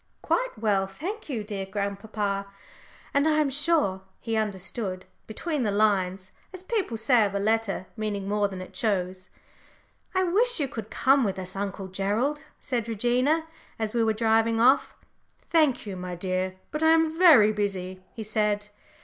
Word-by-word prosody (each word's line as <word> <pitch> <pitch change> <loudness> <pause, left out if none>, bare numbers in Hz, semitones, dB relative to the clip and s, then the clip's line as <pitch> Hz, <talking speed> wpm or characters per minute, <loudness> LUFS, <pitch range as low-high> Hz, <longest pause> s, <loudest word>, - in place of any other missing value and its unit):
"Quite - - 0
well, 205 -3 +1
thank 355 - -6
you, 235 -6 -2
dear 200 -2 -5
grandpapa," 200 0 -3 0.7
and 280 +2 +3
I 310 -1 +3
am 295 -3 +2
sure 290 - +1 0.2
he 225 -1 -3
understood 195 -2 -3 0.2
"between 300 +6 -3
the 220 - +1
lines," 195 -2 +1 0.2
as 370 -1 -10
people 380 - -1
say 225 +1 +4
of 200 -1 -1
a - - +1
letter 215 -2 0
meaning 210 -3 -3
more 205 0 +1
than 190 -2 -7
it - - -14
shows. 185 -6 -1 0.9
"I 375 - +3
wish 430 +5 +3
you 285 - 0
could 225 -4 -7
come 270 0 +3
with 195 -4 -1
us, 185 0 -6
Uncle 195 -1 -4
Gerald," 210 +10 -1 0.2
said 235 -3 -2
Regina, 250 +8 +1 0.3
as 220 -1 -2
we 235 -1 +2
were 220 -1 +2
driving 225 +1 +2
off. 260 +4 +4 0.6
"Thank 305 -8 +3
you, 200 -2 -5
my 180 -1 -5
dear, 185 +1 -2 0.2
but 300 - -3
I 320 - +5
am 320 -1 +2
very 280 - +8
busy," 190 -3 -3
he 225 - -5
said. 210 -1 0
215 Hz, 165 wpm, -26 LUFS, 195-270 Hz, 0.9 s, very